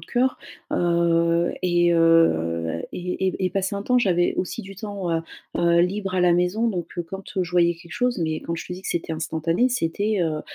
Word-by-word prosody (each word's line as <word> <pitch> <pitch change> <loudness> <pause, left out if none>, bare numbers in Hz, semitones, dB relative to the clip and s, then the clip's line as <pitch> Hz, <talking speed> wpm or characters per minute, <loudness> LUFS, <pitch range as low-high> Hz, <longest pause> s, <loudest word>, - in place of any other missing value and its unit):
de - - -13
coeur, 255 +1 +1 0.3
heu, 170 0 +2
et 175 -1 +3
heu 85 - +3
et 180 +1 -4
et 185 0 -1
et 185 - +1
passé 195 0 -1
un 200 - -3
temps 250 +4 +3
j'avais 175 -6 +2
aussi 180 - -3
du 195 +1 -11
temps, 200 -3 -4
heu 165 - +1 0.4
heu, 170 0 +4
libre 190 +1 -2
à 180 - +2
la 175 -1 +5
maison 180 +7 +1
donc, 175 -5 -3
heu, 175 - -1
quand 190 +4 -8 0.2
je 180 - -5
voyais 175 -1 +3
quelque 170 0 -14
chose 250 0 0
mais 160 -1 -1
quand 170 - -4
je 165 - -6
te - - -6
dis 180 - -7
que - - -6
c'était 165 -1 -2
instantané 165 +8 0
c'était, 205 -1 0
heu, 155 -2 -1
175 Hz, 215 wpm, -23 LUFS, 165-195 Hz, 0.4 s, la